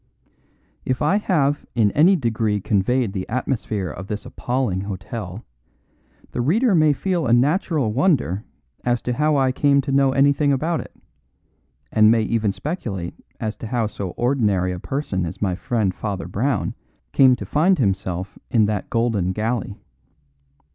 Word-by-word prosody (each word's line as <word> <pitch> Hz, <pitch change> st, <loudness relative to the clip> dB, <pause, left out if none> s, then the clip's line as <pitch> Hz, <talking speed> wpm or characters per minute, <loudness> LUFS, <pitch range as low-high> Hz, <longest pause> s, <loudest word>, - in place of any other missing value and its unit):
If 130 Hz, +1 st, -1 dB
I 190 Hz, +8 st, +3 dB
have 145 Hz, -8 st, +1 dB
in 110 Hz, -4 st, +3 dB
any 170 Hz, -, +5 dB
degree 110 Hz, -, 0 dB
conveyed 105 Hz, +3 st, +1 dB
the 95 Hz, -2 st, -4 dB
atmosphere 110 Hz, -6 st, -2 dB
of 95 Hz, +2 st, -8 dB
this 105 Hz, 0 st, -5 dB
appalling 120 Hz, -7 st, -2 dB
hotel, 100 Hz, +1 st, -6 dB, 0.9 s
the -, -, -2 dB
reader 210 Hz, -, +2 dB
may 155 Hz, -3 st, +5 dB
feel 175 Hz, +1 st, -1 dB
a 115 Hz, -, +3 dB
natural 140 Hz, -, +2 dB
wonder 125 Hz, -, +1 dB, 0.4 s
as 120 Hz, -1 st, 0 dB
to 125 Hz, -, -1 dB
how 150 Hz, +3 st, +2 dB
I 135 Hz, -1 st, +3 dB
came 140 Hz, +1 st, +3 dB
to 135 Hz, 0 st, -4 dB
know 135 Hz, 0 st, +4 dB
anything 140 Hz, +2 st, +3 dB
about 160 Hz, +5 st, 0 dB
it, -, -, -9 dB, 1.0 s
and 110 Hz, 0 st, +5 dB
may 115 Hz, 0 st, +4 dB
even 110 Hz, -2 st, 0 dB
speculate 95 Hz, -, -4 dB, 0.3 s
as 110 Hz, -1 st, -3 dB
to 115 Hz, -, -7 dB
how 120 Hz, -1 st, 0 dB
so 100 Hz, -3 st, -4 dB
ordinary 105 Hz, -8 st, +1 dB
a 90 Hz, -, -5 dB
person 120 Hz, -6 st, -2 dB
as 85 Hz, +1 st, -5 dB
my 95 Hz, -3 st, 0 dB
friend 100 Hz, 0 st, -1 dB
Father 100 Hz, -1 st, -4 dB
Brown 130 Hz, +6 st, -1 dB, 0.4 s
came 130 Hz, -2 st, +6 dB
to 100 Hz, -, -7 dB
find 170 Hz, -, +3 dB
himself 95 Hz, -, -2 dB
in 110 Hz, -3 st, +3 dB
that 105 Hz, -2 st, -2 dB
golden 110 Hz, -6 st, 0 dB
galley. 110 Hz, -1 st, -2 dB
120 Hz, 155 wpm, -22 LUFS, 100-140 Hz, 1.0 s, came